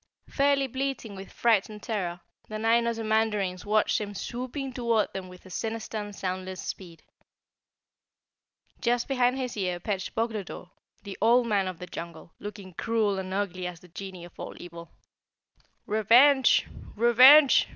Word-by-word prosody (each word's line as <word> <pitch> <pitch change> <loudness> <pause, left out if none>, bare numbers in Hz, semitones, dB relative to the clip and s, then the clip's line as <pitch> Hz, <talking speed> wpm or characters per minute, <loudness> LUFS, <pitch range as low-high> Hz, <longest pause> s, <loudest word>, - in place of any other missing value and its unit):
Fairly 280 -1 +2
bleating 260 -4 -4
with 190 0 -10
fright 225 -4 +2
and 210 -1 -11
terror, 180 -7 -3 0.3
the 215 - -5
nine 230 +2 +2
Ozamandarins 220 -5 0
watched 215 +1 +2
him 205 -1 -6
swooping 255 +5 -5
toward 235 -3 0
them 185 -1 -6
with 180 +1 -14
a 185 - -13
sinister 225 +1 -4
and 205 -1 -7
soundless 185 -1 -4
speed. 170 -4 -8 1.8
Just 240 0 0
behind 255 -1 +1
his 255 -2 -4
ear 180 -4 -2
perched 190 0 -4
Boglodore, 215 -5 -4 0.3
the 200 -1 -8
Old 240 +3 +4
Man 200 -4 +1
of 185 -2 -5
the 180 - -7
Jungle, 170 -1 -9
looking 205 -3 -9
cruel 215 0 0
and 190 0 -6
ugly 185 -2 -2
as 175 -2 -8
the 180 - -17
genie 185 0 -8
of 175 - -17
all - - -7
evil. 170 -1 -10 1.0
"Revenge! 245 +6 +5 0.3
Revenge!" 255 +6 +7
210 Hz, 150 wpm, -27 LUFS, 185-235 Hz, 1.8 s, Revenge